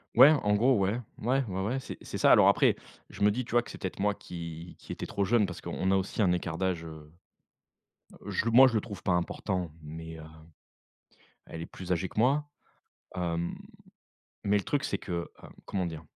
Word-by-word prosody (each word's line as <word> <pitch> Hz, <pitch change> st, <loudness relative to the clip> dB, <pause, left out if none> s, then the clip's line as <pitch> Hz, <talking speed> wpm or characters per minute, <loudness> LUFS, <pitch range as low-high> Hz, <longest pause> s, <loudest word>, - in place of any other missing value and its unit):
Ouais, 135 Hz, +5 st, +9 dB
en 105 Hz, -9 st, +2 dB
gros, 125 Hz, +5 st, +4 dB
ouais. 100 Hz, +5 st, +1 dB, 0.2 s
Mouais, 130 Hz, +4 st, +1 dB
ouais, 95 Hz, -1 st, -3 dB
ouais 120 Hz, +7 st, -1 dB
c'est -, -, -8 dB
c'est -, -, -6 dB
ça, -, -, +5 dB
alors, -, -, +7 dB
après, -, -, +4 dB, 0.4 s
je -, -, -11 dB
me 105 Hz, -, +6 dB
dis, 120 Hz, +3 st, -2 dB
tu -, -, -11 dB
vois, 120 Hz, -, +4 dB
que 120 Hz, -, -13 dB
c'est -, -, -8 dB
peut-être 95 Hz, -, -5 dB
moi 105 Hz, 0 st, +1 dB
qui 85 Hz, 0 st, -8 dB
qui -, -, -10 dB
était -, -, -5 dB
trop 100 Hz, -, -2 dB
jeune, 110 Hz, +1 st, +3 dB
parce 90 Hz, -2 st, -7 dB
qu'on 95 Hz, +1 st, -1 dB
a 95 Hz, -, +4 dB
aussi 95 Hz, +3 st, -2 dB
un 90 Hz, -, +3 dB
écart 85 Hz, -2 st, -2 dB
d'âge, 95 Hz, -3 st, -1 dB
heu, 80 Hz, -2 st, -10 dB, 1.1 s
heu 100 Hz, -, -7 dB
je 100 Hz, -, 0 dB
le 115 Hz, -, 0 dB
moi 130 Hz, +3 st, +9 dB
je 120 Hz, -, -3 dB
le 110 Hz, -, +3 dB
trouve 105 Hz, -2 st, -9 dB
pas 90 Hz, -, +1 dB
important 90 Hz, 0 st, -1 dB
mais, 80 Hz, +1 st, -8 dB
heu, -, -, -9 dB, 1.2 s
elle 80 Hz, -, -8 dB
est 85 Hz, -, -5 dB
plus 90 Hz, -1 st, -10 dB
âgée 90 Hz, +1 st, 0 dB
que -, -, -9 dB
moi. 140 Hz, +5 st, +3 dB, 0.7 s
Hem, 85 Hz, -1 st, -2 dB, 0.9 s
mais 105 Hz, 0 st, +3 dB
le 100 Hz, -, -2 dB
truc 145 Hz, -1 st, -1 dB
c'est 100 Hz, -, -1 dB
que, 95 Hz, -, -9 dB, 0.3 s
heu, -, -, -10 dB, 0.2 s
comment 95 Hz, -2 st, -2 dB
dire? 80 Hz, -2 st, -6 dB
95 Hz, 225 wpm, -29 LUFS, 85-115 Hz, 1.2 s, Ouais